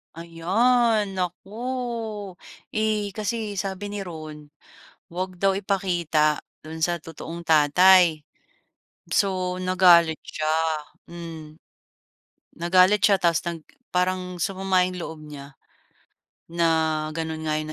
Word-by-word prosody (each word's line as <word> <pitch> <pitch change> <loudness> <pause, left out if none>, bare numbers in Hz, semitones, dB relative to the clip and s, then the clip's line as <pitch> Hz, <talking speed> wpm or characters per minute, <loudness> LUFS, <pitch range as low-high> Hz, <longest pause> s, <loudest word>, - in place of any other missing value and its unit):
Ayan! 205 +5 +1
Naku! 180 +1 -4 1.2
Eh, 215 -1 0
kasi 215 -1 -3
sabi 195 +1 -4
ni 205 -1 -5
Ron 155 -3 -9 0.7
huwag 185 +1 -4
daw 195 +2 +2
ipakita 175 -6 0 0.2
don 160 +1 -8
sa 175 +2 +1
totoong 165 +1 -8
tatay. 160 +1 +5 0.8
So, 185 0 0
nagalit 180 -3 +4
siya, 155 0 -3 0.6
hmm, 165 -3 -9 1.0
nagalit 185 +4 +3
siya 200 -2 +5
tapos 170 -3 +1
nag 165 -2 -8 0.2
parang 180 0 -1
sumama 190 +1 +1
yung 180 0 -5
loob 160 -2 -7
nya 140 -2 -11 0.9
na 170 0 0 0.4
ganun 160 0 -4
nga 155 0 0
yung 155 0 -5
180 Hz, 105 wpm, -24 LUFS, 160-190 Hz, 1.2 s, tatay